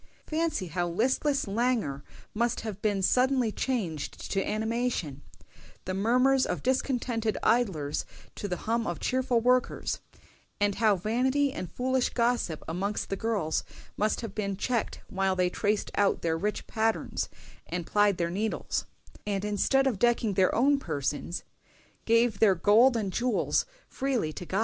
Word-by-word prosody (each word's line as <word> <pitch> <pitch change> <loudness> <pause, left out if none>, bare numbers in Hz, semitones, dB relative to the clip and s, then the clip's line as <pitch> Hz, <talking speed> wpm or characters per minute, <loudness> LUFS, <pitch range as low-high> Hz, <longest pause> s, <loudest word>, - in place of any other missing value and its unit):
Fancy 315 - -1
how 175 +2 -1
listless 260 - +1
languor 205 - 0 0.3
must 235 +2 0
have 210 -3 -6
been 205 -3 0
suddenly 255 +1 +3
changed 195 - -3
to 195 -1 +1
animation; 220 - -2 0.6
the 185 - -2
murmurs 250 +7 +3
of - - -3
discontented 245 -4 0
idlers 185 -12 +1 0.3
to 205 - -5
the 180 -2 -2
hum 230 0 0
of 175 - -3
cheerful 255 -2 +1
workers; 250 +1 +1 0.6
and 205 0 +2
how 215 -2 +5
vanity 260 +8 +1
and 180 - -6
foolish 260 0 0
gossip 235 -9 0
amongst 195 +6 -2
the - - +1
girls 200 -7 -1 0.3
must 215 +1 0
have 225 -4 -6
been 200 -3 -2
checked 235 +2 -1
while 190 0 0
they 180 -1 +1
traced 210 +1 0
out 200 -1 +1
their 165 -1 +1
rich 210 +6 -2
patterns 220 0 -1 0.4
and 175 -1 -3
plied 205 -1 +3
their 170 -1 -1
needles; 215 +4 -2 0.4
and 200 -1 -1
instead 210 +6 +2
of 245 -8 0
decking 235 -2 +2
their 185 -1 +3
own 275 +4 +4
persons, 145 - -3 0.6
gave 230 -2 +3
their 200 -4 +5
gold 225 +8 +5
and 200 -4 -2
jewels 245 - +1 0.2
freely 250 - -1
to 175 - -7
God!" 190 - 0
215 Hz, 150 wpm, -28 LUFS, 190-245 Hz, 0.6 s, how